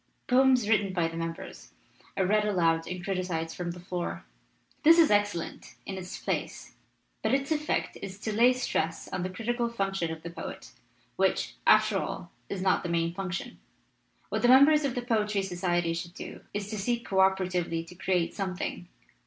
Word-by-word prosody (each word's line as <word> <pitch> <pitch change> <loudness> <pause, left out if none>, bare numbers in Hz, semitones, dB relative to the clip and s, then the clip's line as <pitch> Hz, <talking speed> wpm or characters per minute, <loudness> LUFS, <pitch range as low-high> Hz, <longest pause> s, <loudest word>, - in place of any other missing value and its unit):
Poems 255 -3 +4
written 205 -3 +2
by 170 -3 +1
the 165 - -7
mem 165 0 -2
bers - - -11 0.4
are 190 - +2
read 210 +3 +3
aloud 165 -5 +2
and 180 -1 -5
criticized 175 -4 -2
from 175 -1 -4
the 175 +1 -6
floor. 175 0 -4 0.6
This 325 +2 +7
is 330 -7 +6
excellent, 205 -5 -1
in 195 - -5
its 185 -1 -6
place, - - -3 0.5
but - - +2
its 275 +2 -2
effect 300 -1 -1
is 190 -1 -6
to 220 - -2
lay 235 +4 +6
stress 165 -10 -2
on 185 - -3
the 185 - -2
critical 235 +5 -1
function 195 -6 -1
of 160 0 -7
the 170 - -6
poet, 170 - -8 0.5
which, - - +1
after - - +5
all, - - -5 0.2
is 185 -2 -3
not 190 - +3
his 175 - -3
main 170 0 +1
function. 190 0 -5 0.7
What 220 - -1
the 240 - +4
members 285 +4 +7
of 265 - -1
the 245 - -2
Poetry 210 -4 +1
Society 175 -2 0
should 170 +1 -6
do - - -8
is 205 -1 -3
to 215 - -3
seek 235 +4 -1
co 190 - 0
operatively 185 -3 +2
to 165 - -13
create 180 -1 0
something. 185 -2 -4
190 Hz, 185 wpm, -29 LUFS, 175-220 Hz, 0.7 s, This